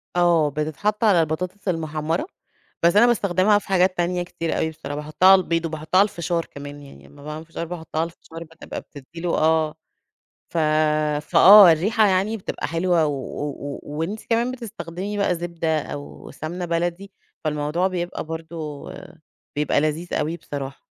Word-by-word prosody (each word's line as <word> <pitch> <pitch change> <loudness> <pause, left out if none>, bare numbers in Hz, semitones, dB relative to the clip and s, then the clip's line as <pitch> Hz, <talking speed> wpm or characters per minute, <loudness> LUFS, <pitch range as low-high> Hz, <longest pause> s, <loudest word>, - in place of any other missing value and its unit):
آه، 170 -3 +4
بتتحط 155 +9 -2
على 205 -6 +5
البطاطس 180 +6 -3
المحمرة 160 - -1 0.6
بس 170 +2 +4
أنا 210 +3 +7
باستخدمها 205 -2 +3
في - - -17
حاجات 185 -1 +2
تانية 175 +1 0
كتير 165 -2 -3
أوي 160 - 0
بصراحة، 155 -2 -7
باحطها 150 +5 +1
على 190 - +7
البيض 165 -1 -1
وباحطها 155 +2 0
على 200 - +7
الفشار 170 -1 -2
كمان 145 0 -10
يعني 140 - -14
لمّا 145 0 -16
باعمل 150 +2 -7
فشار، 165 +1 -5
باحطها 160 -2 -5
على - - +1
الفشار 165 0 -11
بقى 165 0 -19
بتبقى - - -7
بتدي 145 +3 -12
له 175 -1 0
آه 155 -1 +2 0.8
ف 170 - -2 0.7
فآه، 200 -3 +9
الرِّيحَة 210 +7 +2
يعني 195 +3 +1
بتبقى 200 - -4
حلوة 165 0 +1
و 145 - -1
و 140 +2 -4
و 140 0 -6
وأنتِ 165 +9 -4
كمان 235 +2 +2
بتستخدمي 205 -4 -6
بقى 200 -3 +2
زبدة 170 -2 -1
أو 145 0 -9
سمنة 175 +4 -5
بلدي 175 +3 -2 0.3
فالموضوع 150 +4 0
بيبقى 175 -1 -4
برضه 160 -2 -7 0.7
بيبقى 150 -1 +2
لذيذ 155 +3 -2
أوي 155 +3 -1
بصراحة. 140 -4 -7
165 Hz, 165 wpm, -23 LUFS, 155-185 Hz, 0.8 s, فآه